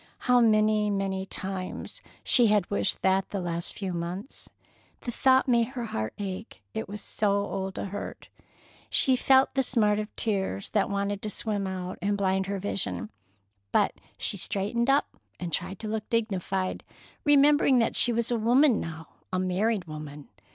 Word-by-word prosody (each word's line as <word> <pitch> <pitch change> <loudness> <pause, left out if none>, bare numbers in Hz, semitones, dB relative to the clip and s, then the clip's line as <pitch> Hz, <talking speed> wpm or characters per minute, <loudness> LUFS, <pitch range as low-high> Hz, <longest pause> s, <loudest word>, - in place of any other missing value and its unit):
How 250 -1 +3
many, 215 -1 +3
many 195 -1 -2
times 190 -1 -5 0.2
she 240 -3 +5
had 205 -3 +2
wished 200 - 0
that 190 0 +2
the 200 - -3
last 170 -1 -3
few 190 -3 -3
months! 175 - -6 0.5
The 240 - -4
thought 260 +2 +3
made 235 -2 +3
her 240 - -2
heart 110 - -4
ache, 200 +2 -6
it 220 -3 -4
was 205 0 -6
so 210 - 0
old 195 -1 -2
a - - -3
hurt. 200 +1 -7 0.6
She 260 - +4
felt 265 +1 +4
the 270 - +2
smart 215 -5 +2
of 210 - -3
tears 190 - -2
that 205 - +1
wanted 200 0 -2
to 215 - -3
swim 205 -2 -2
out 185 -1 -5
and 200 +2 0
blind 190 -1 +1
her 200 0 -2
vision, 105 - -3 0.6
but - - +3 0.2
she - - 0
straightened 225 +5 0
up 275 +1 +4 0.3
and 175 -3 -5
tried 185 +4 -2
to 220 - -4
look 215 0 -3
dignified, 195 -4 -1 0.4
remembering 290 -2 +5
that 230 - +2
she 245 - +5
was 235 0 0
a 235 - +1
woman 245 +3 +4
now—a 165 +3 -7
married 185 +2 0
woman. 150 -2 -9
200 Hz, 165 wpm, -27 LUFS, 185-230 Hz, 0.6 s, she